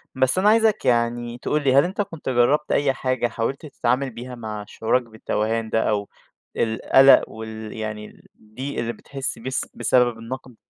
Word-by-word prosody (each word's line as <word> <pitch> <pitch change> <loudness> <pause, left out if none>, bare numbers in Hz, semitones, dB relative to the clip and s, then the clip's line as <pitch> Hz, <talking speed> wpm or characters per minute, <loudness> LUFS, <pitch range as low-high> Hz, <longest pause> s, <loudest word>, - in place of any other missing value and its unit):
بس 130 +5 +2
أنا 205 +3 +4
عايزك 220 -1 +3
يعني 120 0 0
تقول 150 +3 -1
لي 130 -2 +3
هل 140 - +7
أنتَ 190 +3 -2
كنت 165 -8 -5
جرّبت 130 +5 +2
أي 140 -2 +2
حاجة 130 -2 -1
حاولت 125 +7 -3
تتعامل 135 -1 -1
بيها 125 +2 -8
مع 110 -3 -6
شعورك 115 +3 0
بالتوهان 110 0 -2
ده 110 0 +1
أو 100 -1 -1 0.5
القلق 130 +4 +5
وال 110 -1 -8
يعني 105 -1 -7 0.2
الضيق 130 +7 -6
اللي 120 0 -2
بتحس 135 +1 -4
بس 130 +3 -3
بسبب 125 -2 +2
النقد؟ 125 +1 -8
120 Hz, 165 wpm, -23 LUFS, 110-135 Hz, 0.5 s, هل